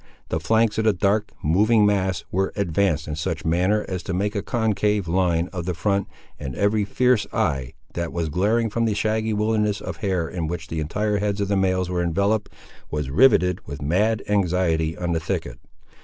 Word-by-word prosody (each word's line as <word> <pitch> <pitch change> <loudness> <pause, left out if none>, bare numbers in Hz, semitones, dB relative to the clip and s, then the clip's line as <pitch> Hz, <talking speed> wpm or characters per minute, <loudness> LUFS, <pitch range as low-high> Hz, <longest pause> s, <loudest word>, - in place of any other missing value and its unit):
The - - -1
flanks 110 +6 +2
of 110 - 0
the 110 - +4
dark, 100 +3 +1
moving 105 +7 +4
mass, 95 -4 +1
were 95 +1 0
advanced 85 -5 0
in 75 - -3
such 80 +1 -3
a - - -4
manner 90 +6 +2
as 90 -2 -3
to 95 - -4
make 100 +3 -1
a 100 - -1
concave 105 -4 0
line 85 -1 +1
of 90 -2 -4
the 90 - -1
front, 100 +4 0 0.3
and 65 -4 -5
every 105 +1 +1
fierce 125 +2 +2
eye, 65 -2 -1 0.2
that 85 -1 -3
was 85 -2 -2
glaring 105 +7 +1
from 115 +2 0
the 110 -2 0
shaggy 110 +1 0
wilderness 105 0 +1
of - - -6
hair 95 -5 -1
in 85 -2 -3
which 80 -1 -5
the 80 - -3
entire 105 +7 -1
heads 100 0 -1
of 100 -1 -1
the 100 - +2
males 95 -1 +1
were 90 -1 -1
enveloped, 100 +5 0 0.4
was 75 -3 -3
riveted 90 - +4
with 70 +1 -6
mad 105 +8 +1
anxiety 90 -5 +1
on 90 -1 -2
the 80 - +1
thicket. 60 -5 -4
95 Hz, 200 wpm, -23 LUFS, 85-105 Hz, 0.4 s, the